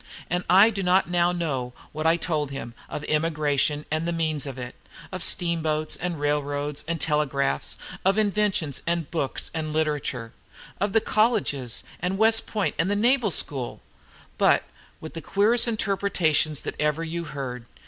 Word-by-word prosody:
And 180 0 0
I 200 +5 +7
do 200 - -3
not 180 -1 +3
now 175 0 +3
know 135 -8 -2 0.2
what 155 +1 -1
I 165 +1 +4
told 155 -4 -1
him, 135 -4 -6 0.2
of 150 - -5
emigration, 150 -2 +1
and 155 +2 0
the - - +1
means 155 -3 -1
of 135 -1 -6
it, 125 -1 -6 0.4
of 185 -1 -5
steamboats, 160 -3 +1
and 175 -3 -3
railroads, 145 0 -1
and 170 0 -1
telegraphs, 140 - 0 0.3
of 195 +2 +3
inventions, 205 -9 +1
and 170 -3 -1
books, 160 -5 -2
and 155 -1 -3
literature, 145 -7 -1 0.5
of 200 0 0
the 225 - +4
colleges, 205 - +1 0.2
and 180 +2 -1
West 225 +1 +4
Point, 210 -3 -1
and 165 +3 +2
the 205 - +2
Naval 235 +1 +3
School, 140 -7 -2 0.6
but - - +4 0.4
with 160 - -8
the 165 - -6
queerest 220 +9 +3
interruptions 190 -9 +1
that - - -4
ever 150 +2 +1
you 170 +1 -4
heard. 130 -5 -6
160 Hz, 160 wpm, -25 LUFS, 145-185 Hz, 0.6 s, I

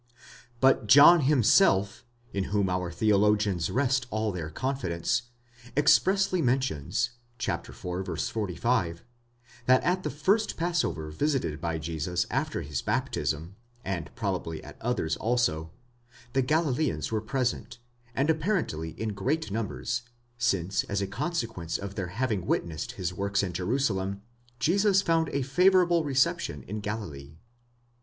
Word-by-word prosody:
But 130 -4 +4
John 145 +9 +9
himself, 125 - +4 0.3
in 100 -1 -1
whom 100 -2 0
our 90 -1 -1
theologians 105 -1 +2
rest 130 -1 +1
all 110 -1 -1
their 85 -4 -5
confidence, 120 - -2 0.5
ex 145 0 +6
pressly 190 -1 +1
mentions 120 - 0 0.3
(iv. 125 - -2 0.6
45) 100 -4 -1 0.6
that 130 0 +5
at 185 +1 +1
the - - -3
first 195 - +1
passover 160 - -1
visited 130 - -1
by 85 -1 -1
Jesus 80 +2 -2
after - - -1
his 70 -2 -3
baptism 80 +5 -2 0.3
(and 90 -5 -3
probably 90 -6 -3
at - - -12
others 110 -10 -1
also) 110 -10 0 0.6
the 135 - +3
Galileans 135 - 0
were 110 -1 0
present, 120 +1 -2 0.4
and 140 - +1
appar 160 +3 +1
ently 80 +1 -6
in 110 - -2
great 110 +6 -2
numbers, 115 +2 -2 0.4
since 95 -5 +1
as 100 0 -1
a - - 0
consequence 115 - -3
of 100 0 -6
their 95 -2 -3
having 105 -1 -2
witnessed 80 -3 -2
his 90 -2 -3
works 100 +2 0
in 90 -3 -3
Jerusalem, 100 -1 -1 0.3
Jesus 195 - +3
found 165 -3 +2
a 140 - -1
favourable 175 +3 +4
reception 130 - 0
in 105 +3 -5
Galilee. 85 -9 -6
110 Hz, 130 wpm, -28 LUFS, 90-135 Hz, 0.6 s, John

